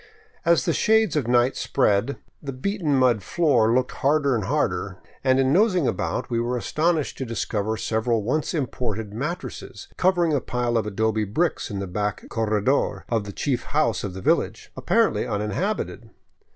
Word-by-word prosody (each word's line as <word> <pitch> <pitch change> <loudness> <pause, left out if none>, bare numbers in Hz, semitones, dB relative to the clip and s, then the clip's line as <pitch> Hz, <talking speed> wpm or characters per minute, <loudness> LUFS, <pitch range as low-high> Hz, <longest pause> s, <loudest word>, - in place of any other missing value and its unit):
As 170 0 +3
the 165 - +2
shades 220 +1 +3
of 140 -6 0
night 120 +1 +3
spread, 115 +1 +1 0.2
the 140 - -5
beaten 155 +2 -1
mud 125 -5 +3
floor 125 - +2
looked 125 +1 +1
harder 140 0 +2
and 110 -5 -1
harder, - - -1 0.3
and 130 0 +3
in 135 +1 +3
nosing 185 - +3
about - - -2
we 115 -2 -1
were 120 +1 -1
astonished 155 +5 0
to - - -1
discover 110 -2 -2
several 110 0 0
once 150 +9 -1
imported 110 -7 -3
mattresses 150 +10 -6
covering 175 -3 +2
a 140 - +1
pile 120 -1 -1
of 110 -2 +1
adobe 110 +1 0
bricks 160 - -1
in 100 - -4
the 100 - -3
back 105 +2 -3
corredor 110 +4 0
of 115 -3 0
the 100 - -6
chief 125 +4 -1 0.2
house 115 -10 +1
of 95 -3 -5
the 95 - -6
village, - - 0
apparently - - +1
uninhabited. 105 - -2
125 Hz, 165 wpm, -24 LUFS, 110-150 Hz, 0.3 s, As